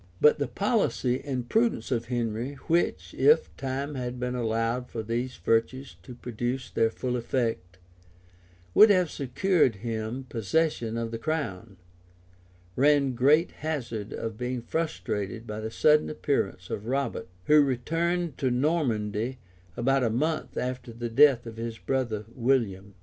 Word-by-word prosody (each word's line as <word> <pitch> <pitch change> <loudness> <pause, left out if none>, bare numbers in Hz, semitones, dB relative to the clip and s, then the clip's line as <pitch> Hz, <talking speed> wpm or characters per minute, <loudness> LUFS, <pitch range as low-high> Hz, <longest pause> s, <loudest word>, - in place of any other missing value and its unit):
] 90 - -29
But 150 - +5
the 145 - 0
policy 140 - 0
and 130 -4 -3
prudence 225 - +1
of 120 -2 0
Henry, 120 +1 -2
which, 170 +2 0
if 465 +1 +3
time 135 +2 -3
had 125 -2 -4
been 125 0 -2
allowed 115 +1 -1
for 115 - -4
these 120 +3 -2
virtues 115 0 0
to 120 +8 -10
produce 120 +2 -4
their 115 - +2
full 125 +2 -3
effect, 115 -7 -2 1.0
would 215 - +8
have 185 -5 +3
secured 140 - +1
him 115 +3 -3
possession 115 0 0
of 115 -1 -3
the 115 - -4
crown, 115 - -3 1.0
ran 140 0 +3
great 145 +7 +4
hazard 120 -9 -4
of 115 -1 -5
being 125 -1 -3
frustrated 115 -8 -3
by 105 -1 -5
the 110 0 -4
sudden 150 +6 +3
appearance 100 -12 -2
of 105 - -4
Robert, 135 +2 -1 0.2
who 150 0 +6
returned 165 +4 -1
to 130 - +1
Normandy 125 -5 0 0.4
about 135 +2 +2
a 115 - +2
month 155 +8 -1
after 125 -1 -3
the 120 +1 -5
death 120 +1 +5
of 115 -1 -8
his 115 0 -4
brother 115 -6 -2
William. 110 -7 0
125 Hz, 145 wpm, -27 LUFS, 115-140 Hz, 1.0 s, would